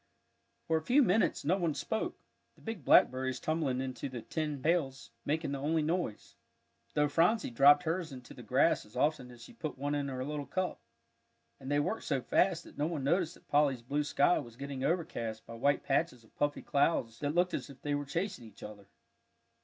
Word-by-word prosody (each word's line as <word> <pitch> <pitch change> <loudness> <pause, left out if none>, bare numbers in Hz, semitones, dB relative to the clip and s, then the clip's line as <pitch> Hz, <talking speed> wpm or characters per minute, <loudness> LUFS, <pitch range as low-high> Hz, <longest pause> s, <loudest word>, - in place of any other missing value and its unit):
For 160 - +2
a - - -2
few 270 - +5
minutes 200 - +2
no 180 +6 +3
one 170 -5 0
spoke; 220 - -2 0.4
the - - -22
big 225 -9 -6
blackberries 130 0 +4
tumbling 150 -3 -1
into 130 +1 -4
the 120 -3 -7
tin 150 -3 -3
pails 140 -3 0
making 155 0 -1
the 140 - -3
only 155 +3 +1
noise, 165 - -3 0.6
though 150 0 +3
Phronsie 170 - +2
dropped 140 +5 +6
hers 165 -1 -2
into 125 -2 -10
the - - -11
grass - - +2
as 105 +3 -19
often 140 -1 0
as 120 -1 -13
she - - -13
put 155 - -5
one 145 +2 -2
in 145 -1 -1
her 130 -1 -4
little 145 -1 -4
cup. 185 -1 -2 0.8
And 135 +1 -6
they 145 - +3
worked 220 +10 -2
so 140 -3 0
fast, 170 +6 +2
that - - -14
no 150 - +1
one 160 -5 -3
noticed 170 +4 +1
that - - -22
Polly's 145 -4 +2
blue 145 +5 -1
sky 145 +3 +3
was 120 -1 -9
getting 140 -1 -5
overcast 120 -10 -2
by - - -10
white 140 +5 +1
patches 135 -4 0
of 110 - -24
puffy 145 0 -1
clouds 130 -6 +1
that 145 +1 -2
looked 180 0 +2
as - - -3
if 140 - -12
they 145 - -1
were 145 0 -1
chasing 165 - -3
each 105 - -15
other. 105 -2 -10
145 Hz, 205 wpm, -32 LUFS, 130-165 Hz, 0.8 s, dropped